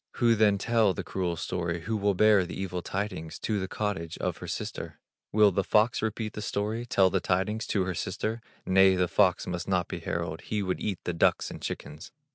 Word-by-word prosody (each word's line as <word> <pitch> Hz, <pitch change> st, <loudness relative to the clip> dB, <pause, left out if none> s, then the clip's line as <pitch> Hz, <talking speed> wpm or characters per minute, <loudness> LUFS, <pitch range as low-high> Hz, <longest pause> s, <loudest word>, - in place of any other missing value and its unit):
Who 120 Hz, -1 st, +3 dB
then 105 Hz, -2 st, +4 dB
tell 110 Hz, -2 st, +2 dB
the -, -, -4 dB
cruel 90 Hz, -3 st, -2 dB
story, 85 Hz, 0 st, -3 dB
Who 110 Hz, +5 st, -2 dB
will 100 Hz, -1 st, +1 dB
bear 105 Hz, 0 st, +5 dB
the 90 Hz, -, -6 dB
evil 90 Hz, -2 st, -3 dB
tidings. 95 Hz, -5 st, -4 dB
To 105 Hz, -2 st, 0 dB
the 95 Hz, -, -3 dB
cottage 95 Hz, -6 st, -3 dB
of -, -, -2 dB
her -, -, -8 dB
sister? -, -, -5 dB, 0.3 s
Will 105 Hz, -1 st, +5 dB
the 95 Hz, +1 st, 0 dB
fox 110 Hz, +5 st, +3 dB
repeat 110 Hz, 0 st, -2 dB
the 105 Hz, -, -5 dB
story 105 Hz, +4 st, -2 dB
Tell 95 Hz, -5 st, +4 dB
the 95 Hz, -, +2 dB
tidings 95 Hz, +5 st, -1 dB
to 100 Hz, -, +1 dB
her 95 Hz, 0 st, -2 dB
sister? 110 Hz, +6 st, -3 dB, 0.2 s
Nay, 95 Hz, 0 st, +5 dB
the 90 Hz, -1 st, +2 dB
fox 95 Hz, 0 st, +3 dB
must 85 Hz, -1 st, -4 dB
not 90 Hz, -3 st, +1 dB
be -, -, -5 dB
herald, 85 Hz, -1 st, -3 dB
He 105 Hz, -2 st, -2 dB
would 95 Hz, -1 st, -2 dB
eat 100 Hz, -4 st, -2 dB
the 90 Hz, -, -2 dB
ducks 85 Hz, -, +2 dB
and -, -, -9 dB
chickens. 75 Hz, +2 st, -6 dB
95 Hz, 215 wpm, -28 LUFS, 90-105 Hz, 0.3 s, bear